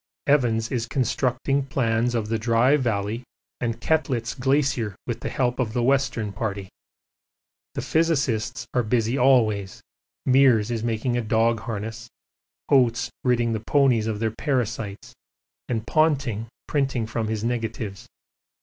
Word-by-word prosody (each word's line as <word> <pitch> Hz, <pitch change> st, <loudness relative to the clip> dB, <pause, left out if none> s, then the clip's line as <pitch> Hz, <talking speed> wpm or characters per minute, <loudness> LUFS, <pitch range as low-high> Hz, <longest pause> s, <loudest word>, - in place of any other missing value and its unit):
Evans 115 Hz, -6 st, +2 dB
is 120 Hz, -2 st, -1 dB
constructing 130 Hz, +2 st, 0 dB
plans 120 Hz, -2 st, 0 dB
of 110 Hz, -2 st, -1 dB
the 110 Hz, 0 st, -1 dB
Dry 115 Hz, +4 st, +3 dB
Valley 115 Hz, -4 st, -1 dB, 0.4 s
and 115 Hz, -2 st, -2 dB
Koettlitz 125 Hz, -4 st, 0 dB
Glacier 130 Hz, -5 st, 0 dB
with -, -, -3 dB
the -, -, -4 dB
help 125 Hz, -1 st, -1 dB
of 115 Hz, -4 st, -1 dB
the 120 Hz, -1 st, 0 dB
Western 130 Hz, -5 st, +1 dB
Party. 100 Hz, -2 st, -4 dB, 1.1 s
The -, -, -3 dB
physicists 130 Hz, -8 st, 0 dB
are 125 Hz, -, +3 dB
busy 115 Hz, +1 st, 0 dB
always, 110 Hz, -7 st, +3 dB, 0.5 s
Meares 125 Hz, -4 st, +4 dB
is 115 Hz, -2 st, -2 dB
making 115 Hz, +1 st, -1 dB
dog 115 Hz, +1 st, +2 dB
harness, 115 Hz, +2 st, -6 dB, 0.6 s
Oates 120 Hz, -4 st, +3 dB
ridding 120 Hz, -2 st, +2 dB
the 110 Hz, -, -1 dB
ponies 130 Hz, -6 st, +3 dB
of 110 Hz, -2 st, -1 dB
their 110 Hz, +1 st, -1 dB
parasites, 115 Hz, -7 st, -2 dB, 0.6 s
and 115 Hz, -3 st, -2 dB
Ponting 135 Hz, -6 st, +1 dB, 0.2 s
printing 135 Hz, -5 st, 0 dB
from 110 Hz, 0 st, -3 dB
his 110 Hz, -1 st, -2 dB
negatives. 115 Hz, -4 st, -3 dB
115 Hz, 130 wpm, -24 LUFS, 110-130 Hz, 1.1 s, Meares